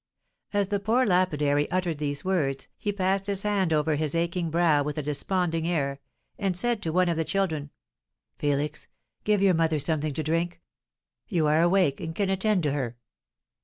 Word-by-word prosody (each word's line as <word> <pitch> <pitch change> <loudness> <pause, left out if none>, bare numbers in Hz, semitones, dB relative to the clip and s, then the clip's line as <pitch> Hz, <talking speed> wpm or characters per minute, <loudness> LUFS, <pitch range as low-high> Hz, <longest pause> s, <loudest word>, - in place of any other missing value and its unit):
As 205 -2 0
the 205 -1 0
poor 230 +6 +2
lapidary 150 -6 +2
uttered 180 -4 -1
these 145 0 -3
words, 140 -8 0
he 205 - -1
passed 195 0 0
his 200 -1 -1
hand 200 -4 +1
over 155 0 +2
his 155 0 -1
aching 170 0 0
brow 160 -3 +3
with 150 +1 -3
a 150 - -2
desponding 165 +3 -1
air, 140 -5 -1 0.4
and 190 -3 0
said 235 +2 +1
to 165 - -2
one 180 +2 +3
of 170 -2 0
the 165 - +1
children: 160 -6 -1 0.7
"Felix, 145 +1 -2 0.4
give 210 -2 +2
your 195 -2 +5
mother 160 -1 +2
something 155 -1 0
to 155 - -1
drink. 165 +3 -1 0.7
You 170 -7 +1
are 155 +2 +3
awake, 175 -5 +3
and 160 -1 -5
can 195 0 0
attend 195 -1 +1
to 145 - +1
her." 125 -4 -3
165 Hz, 180 wpm, -27 LUFS, 150-190 Hz, 0.7 s, your